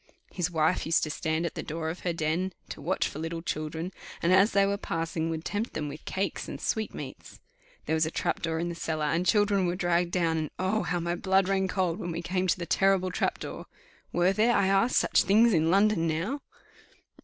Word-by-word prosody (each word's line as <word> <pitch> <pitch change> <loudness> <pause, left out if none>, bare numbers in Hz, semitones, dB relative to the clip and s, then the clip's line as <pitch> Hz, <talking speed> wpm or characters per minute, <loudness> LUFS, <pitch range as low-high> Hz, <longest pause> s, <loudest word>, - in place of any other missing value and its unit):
His 180 -2 -1
wife 160 0 +1
used 165 - +3
to 155 - -2
stand 160 +2 -1
at 170 - -3
the - - -4
door 160 +1 -3
of 175 - -8
her 175 - -1
den 165 +3 -1 0.2
to - - -7
watch 175 +6 0
for 150 - -7
little 165 +1 -4
children, 160 +3 -4 0.3
and, 175 +2 +4
as 195 +4 +5
they 200 0 +4
were 200 0 +1
passing, 165 -4 -2
would 160 0 -4
tempt 215 +3 -3
them 155 - -2
in 145 - -3
with 145 +2 -9
cakes 195 +1 -2
and - - -6
sweetmeats. 220 -1 -4 0.5
There - - -1
was 160 0 +2
a - - -1
trap - - -2
door 165 -1 -1
in 170 +1 -1
the - - -3
cellar, 160 -2 -2
and 165 +4 +1
the - - +1
children 205 -3 +3
were 175 - 0
dragged 175 -1 +1
down; 165 -3 +1
and 155 -2 -3
Oh! 190 +4 0
how 175 - -1
my 170 0 -1
blood 190 +1 +2
ran 190 -1 +1
cold 185 -1 -1
when 175 - -4
we 170 +1 -4
came 185 +1 -1
to 175 - +2
the 175 - -4
terrible 190 +1 +2
trap - - 0
door. - - -7 0.4
Were 175 +2 +3
there, 225 +4 +3
I - - +3
asked, 195 +5 +3
such - - +4
things 220 +3 +4
in 160 -1 +3
London 195 -2 +3
now? 175 - -2
175 Hz, 235 wpm, -28 LUFS, 160-195 Hz, 0.5 s, as